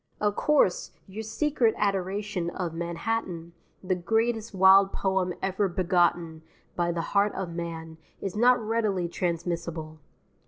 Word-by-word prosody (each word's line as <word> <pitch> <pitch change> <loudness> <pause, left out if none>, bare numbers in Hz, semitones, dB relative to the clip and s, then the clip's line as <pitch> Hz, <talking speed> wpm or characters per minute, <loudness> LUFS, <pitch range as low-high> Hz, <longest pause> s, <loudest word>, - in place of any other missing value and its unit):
Of 205 -1 +1
course, 305 - +2
your 200 +2 -7
secret 230 +1 +1
adoration 195 -2 -1
of 175 -2 -4
Manhattan, 170 0 -3 0.3
the 185 0 0
greatest 225 +5 0
wild 195 +1 +6
poem 190 -2 0
ever 190 +1 +1
begotten 175 -3 +1 0.3
by 175 0 0
the 170 -1 -2
heart 205 +1 +3
of 180 -3 -4
man, 165 -1 -6 0.2
is 195 -1 -4
not 245 +3 +5
readily 215 -5 0
transmissible. 170 -2 -3
190 Hz, 125 wpm, -27 LUFS, 170-210 Hz, 0.3 s, wild